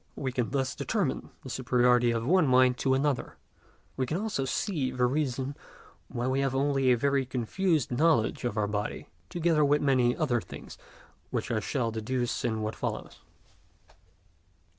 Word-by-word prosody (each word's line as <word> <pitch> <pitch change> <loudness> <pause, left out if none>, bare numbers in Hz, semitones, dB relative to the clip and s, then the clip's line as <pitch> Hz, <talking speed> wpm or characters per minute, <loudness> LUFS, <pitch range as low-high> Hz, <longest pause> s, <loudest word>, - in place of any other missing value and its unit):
We 130 -2 -3
can 125 -2 -1
thus 135 -1 -1
determine - - -2
the - - -8
superiority 125 -1 +3
of 115 -1 -1
one 175 +2 +4
mind 130 -1 +4
to 130 -1 +2
another; 140 -1 -1 0.6
we 130 -1 -1
can 155 - -1
also 205 -10 -2
see 140 -1 -1
the 125 -1 +1
reason 135 0 -1 0.5
why 120 0 -3
we 130 +1 +1
have 135 -1 0
only 135 -1 +2
a 125 - +4
very 140 +2 +2
confused 135 - 0
knowledge 135 -3 +2
of 120 -3 -2
our 105 - +2
body, 105 0 -4 0.2
together 165 -3 +2
with 145 +1 +3
many 130 -4 +2
other 125 -7 +1
things - - -11 0.5
which - - -3
I 110 - +1
shall 115 +1 -1
deduce 120 +2 -2
in 110 -2 -1
what 110 +1 -3
follows. - - -5
130 Hz, 160 wpm, -29 LUFS, 120-140 Hz, 0.6 s, one